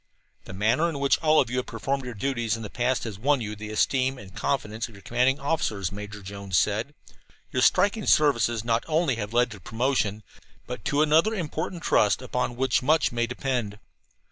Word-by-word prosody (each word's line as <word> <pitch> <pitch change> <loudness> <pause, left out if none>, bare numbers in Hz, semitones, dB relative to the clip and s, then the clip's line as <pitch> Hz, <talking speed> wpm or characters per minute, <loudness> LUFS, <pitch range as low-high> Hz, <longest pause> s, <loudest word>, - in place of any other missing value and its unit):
"The - - -9
manner 115 - +2
in 160 - -4
which 140 0 +2
all 155 -1 +4
of 120 - +1
you 125 - -1
have 125 - -2
performed 135 -1 -3
your 125 -2 -6
duties 120 -1 -1
in 115 - -7
the 105 - -7
past 125 +1 0
has 105 -4 -6
won 140 +4 +2
you 105 -2 -4
the 105 0 -8
esteem 130 +4 +1
and 95 -5 -12
confidence 110 -4 -2
of 110 - -15
your 100 - -15
commanding 125 +5 +1
officers," 110 - -1
Major 105 0 -8
Jones 100 -1 -3
said. 110 +8 0 0.6
"Your - - 0
striking 205 +1 +3
services 120 -7 +3
not 115 0 +1
only 155 -5 +1
have 105 -1 -4
led 120 +1 +2
to 105 - -9
promotion, 110 0 -1 0.4
but 125 - -7
to 145 +1 +2
another 160 +8 +3
important 170 -1 -4
trust, 105 +4 +3
upon 125 -1 -2
which 130 0 +1
much 155 +4 +3
may 120 -1 0
depend. 120 -4 -2
125 Hz, 195 wpm, -26 LUFS, 105-140 Hz, 0.6 s, all